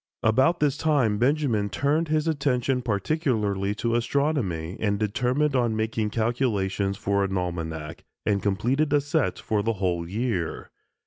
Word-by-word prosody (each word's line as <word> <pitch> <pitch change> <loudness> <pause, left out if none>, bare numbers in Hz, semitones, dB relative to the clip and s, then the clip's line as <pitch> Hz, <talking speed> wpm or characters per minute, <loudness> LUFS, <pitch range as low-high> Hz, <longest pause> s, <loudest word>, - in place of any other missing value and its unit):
About 130 +10 +3
this 145 -1 +1
time 135 -11 +2
Benjamin 125 -6 +1
turned 150 +8 +1
his 155 +1 0
attention 135 -4 +1
particularly 105 - 0
to 115 +1 -1
astronomy, 120 - 0
and 105 -2 0
determined 125 +7 0
on 120 -3 +2
making 110 0 -1
calculations 105 -4 0
for 100 0 0
an 95 -1 -1
almanac, 80 -1 -4 0.2
and 100 -2 +1
completed 120 +9 +1
a 145 - +5
set 145 0 0
for 105 -2 -1
the 115 +2 0
whole 90 -4 -2
year. 100 -5 -2
110 Hz, 140 wpm, -25 LUFS, 100-140 Hz, 0.2 s, a